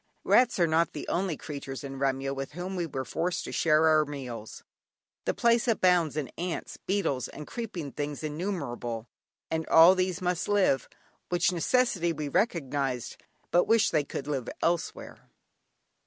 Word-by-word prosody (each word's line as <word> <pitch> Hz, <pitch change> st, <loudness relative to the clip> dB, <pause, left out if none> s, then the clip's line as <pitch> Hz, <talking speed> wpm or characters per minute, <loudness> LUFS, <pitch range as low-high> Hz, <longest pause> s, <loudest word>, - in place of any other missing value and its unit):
Rats 250 Hz, -1 st, +4 dB
are 175 Hz, -, +4 dB
not 165 Hz, 0 st, +2 dB
the -, -, -6 dB
only 175 Hz, -3 st, -1 dB
creatures 140 Hz, -3 st, -7 dB
in 135 Hz, -1 st, -6 dB
Remyo 135 Hz, 0 st, 0 dB
with 135 Hz, +1 st, -5 dB
whom 180 Hz, +3 st, -5 dB
we 175 Hz, -2 st, -1 dB
were 130 Hz, -3 st, -4 dB
forced 170 Hz, +8 st, -2 dB
to -, -, -6 dB
share 160 Hz, 0 st, +3 dB
our 155 Hz, -1 st, +5 dB
meals. 130 Hz, -7 st, -7 dB, 0.6 s
The -, -, 0 dB
place 235 Hz, +1 st, +3 dB
abounds 180 Hz, -8 st, +3 dB
in 145 Hz, -4 st, -3 dB
ants, 175 Hz, 0 st, -3 dB
beetles, 145 Hz, -, -1 dB
and 150 Hz, -, -9 dB
"creeping 180 Hz, -, -5 dB
things 145 Hz, +1 st, -4 dB
innumerable," 150 Hz, -, -3 dB, 0.5 s
and 160 Hz, 0 st, -1 dB
all 165 Hz, +3 st, +8 dB
these 185 Hz, -1 st, 0 dB
must 180 Hz, -2 st, -1 dB
live; 200 Hz, -10 st, +2 dB, 0.4 s
which 175 Hz, 0 st, +2 dB
necessity 180 Hz, -2 st, +1 dB
we 150 Hz, -2 st, -4 dB
recognised, 140 Hz, -, -1 dB, 0.3 s
but 175 Hz, -, +4 dB
wished 225 Hz, -1 st, +3 dB
they 155 Hz, -3 st, +2 dB
could 140 Hz, -, -6 dB
live 140 Hz, -5 st, -3 dB
elsewhere. 170 Hz, 0 st, -2 dB
160 Hz, 155 wpm, -28 LUFS, 140-180 Hz, 0.6 s, all